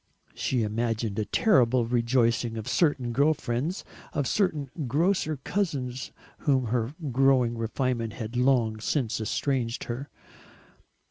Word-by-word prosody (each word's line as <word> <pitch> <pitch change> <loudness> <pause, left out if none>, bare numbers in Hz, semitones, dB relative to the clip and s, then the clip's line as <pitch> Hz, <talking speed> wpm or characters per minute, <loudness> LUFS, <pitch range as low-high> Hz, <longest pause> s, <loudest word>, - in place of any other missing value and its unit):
She 125 -3 0
imagined 110 0 -1
the 110 - -1
terrible 130 - +3
rejoicings 115 -1 +1
of 110 - -5
certain 145 -7 +1
girl 145 +6 +3
friends, 140 +6 -3 0.3
of 145 -2 0
certain 155 -10 0 0.2
grocer 155 - +1
cousins 135 -6 -2 0.3
from - - -21
whom 135 -4 +3
her 120 +3 -1 0.2
growing 130 -2 +3
refinement 115 0 -1
had 115 +1 -6
long 120 -4 +2
since 115 -1 -1
estranged 120 +1 -1
her. 125 +4 -5
125 Hz, 125 wpm, -27 LUFS, 115-140 Hz, 0.3 s, terrible